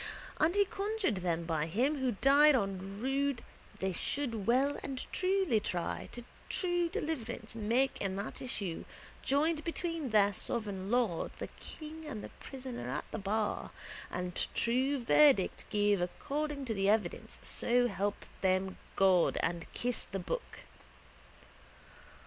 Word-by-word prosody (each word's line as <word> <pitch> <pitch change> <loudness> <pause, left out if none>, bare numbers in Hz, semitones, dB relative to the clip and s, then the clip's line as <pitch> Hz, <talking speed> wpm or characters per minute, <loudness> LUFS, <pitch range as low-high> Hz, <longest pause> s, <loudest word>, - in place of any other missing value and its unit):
And 325 +4 +3
he 405 0 +5
conjured 400 - -1
them 170 -2 -1
by 160 -2 -1
Him 260 - +1
who 260 -2 +1
died 280 +6 +6
on 195 -3 -2
rood 275 +1 +1 0.4
that - - -20
they 190 0 +1
should 230 0 -1
well 265 +4 +3
and 270 -2 -4
truly 370 - +2
try 180 -4 -3
and 240 - -7 0.2
true 350 -2 +1
deliverance 240 -10 -4
make 230 +5 +1
in 195 -1 -1
the 200 +2 -4
issue 200 -9 -2 0.4
joined 305 +3 +2
between 330 -4 -2
their 205 -2 +4
sovereign 200 -2 -2
lord 230 -8 +1
the - - -5
king 315 0 -8
and 220 -8 -5
the - - -7
prisoner 255 - -6
at 135 +4 -3
the - - -3
bar 205 +2 -1 0.4
and 180 -1 -2
true 260 +4 +2
verdict 270 -5 +5
give 205 -2 +2
according 280 +10 -2
to 230 - -1
the 195 -1 +1
evidence 210 -5 0
so 245 0 +3
help 205 -3 -2 0.2
them 190 0 +1 0.2
God 185 -3 +4
and 170 -1 -2
kiss 245 0 -2
the 195 - -1
book. 195 - -4
235 Hz, 145 wpm, -33 LUFS, 195-285 Hz, 0.4 s, died